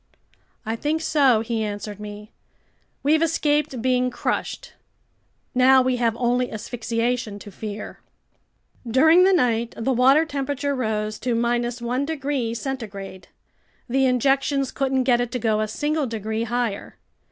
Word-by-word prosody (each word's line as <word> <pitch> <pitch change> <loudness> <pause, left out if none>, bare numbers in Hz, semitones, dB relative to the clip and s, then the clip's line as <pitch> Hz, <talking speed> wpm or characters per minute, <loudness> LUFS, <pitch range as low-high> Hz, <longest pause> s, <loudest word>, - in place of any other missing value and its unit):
"I 220 +1 -2
think 300 +6 -1
so," 275 -8 +3
he 225 -1 -2
answered 205 0 -5
me. 210 +1 -9 0.7
"We've 310 +3 +3
escaped 295 -5 0
being 250 -1 +2
crushed. 245 - -3 0.8
Now 260 +1 +5
we 255 -1 +1
have 235 -2 0
only 245 +1 0
asphyxiation 230 0 -2
to 205 0 -11
fear." 210 +1 -7 0.9
During 315 +9 +6
the 385 - +5
night 235 -9 +1
the 260 +4 0
water 265 +6 +5
temperature 285 -1 -2
rose 215 -4 -2
to 240 -2 0
1 240 +2 -1
degrees 275 -7 -2
centigrade. 205 -8 -6 0.6
The 265 +1 +2
injections 270 +1 +1
couldn't 265 -1 0
get 245 -1 +3
it 245 - -2
to - - 0
go 220 -3 +1
a 215 - -1
single 295 +5 -1
degree 220 0 -3
higher. 240 -3 -3
245 Hz, 135 wpm, -23 LUFS, 225-270 Hz, 0.9 s, During